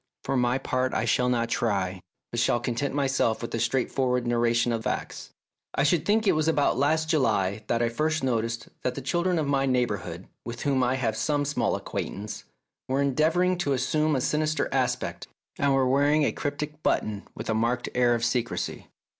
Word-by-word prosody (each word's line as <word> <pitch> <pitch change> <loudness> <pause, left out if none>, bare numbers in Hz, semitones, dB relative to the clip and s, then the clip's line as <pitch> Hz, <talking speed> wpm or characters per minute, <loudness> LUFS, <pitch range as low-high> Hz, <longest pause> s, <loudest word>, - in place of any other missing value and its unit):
For 135 - -1
my 125 0 +2
part 130 -1 -1
I - - +1
shall 125 0 +2
not 120 -2 +1
try, 95 -6 -1 0.3
but 120 - -2
shall 120 - +2
content 125 +4 -2
myself 135 -5 +1
with 115 - -6
a 115 - -1
straightforward 125 +1 0
narration 120 0 +2
of 115 -1 -2
facts. - - -3 0.5
I 140 - +2
should 150 +2 +2
think 220 +2 +3
it 195 - +5
was 155 0 +1
about 150 -3 +2
last 155 +4 +1
July 110 - +1
that 120 0 +1
I 115 - +2
first 155 +5 -1
noticed 115 -2 -1
that 125 0 -1
the 140 - -6
children 175 +6 +1
of 155 - 0
my 135 -1 +1
neigh 125 -1 +3
bourhood, - - -5 0.2
with 120 0 -6
whom 140 -2 +2
I 125 +1 +2
have 115 -4 -1
some 145 +5 0
small 145 +1 0
acquaintance, 105 +2 -5 0.4
were 130 +1 0
endeavouring 165 +6 +2
to 145 -5 +1
assume 150 +4 +1
a 130 - 0
sinister 155 +3 0
aspect, - - -1 0.3
and 140 -1 +3
were 135 -1 +3
wearing 145 +3 +3
a - - +2
cryptic 150 +1 -4
button 105 -7 0
with 110 - -6
a 110 - +1
marked 120 +3 0
air 120 -1 +3
of 115 0 -1
secrecy. 120 0 -2
130 Hz, 195 wpm, -26 LUFS, 115-145 Hz, 0.5 s, it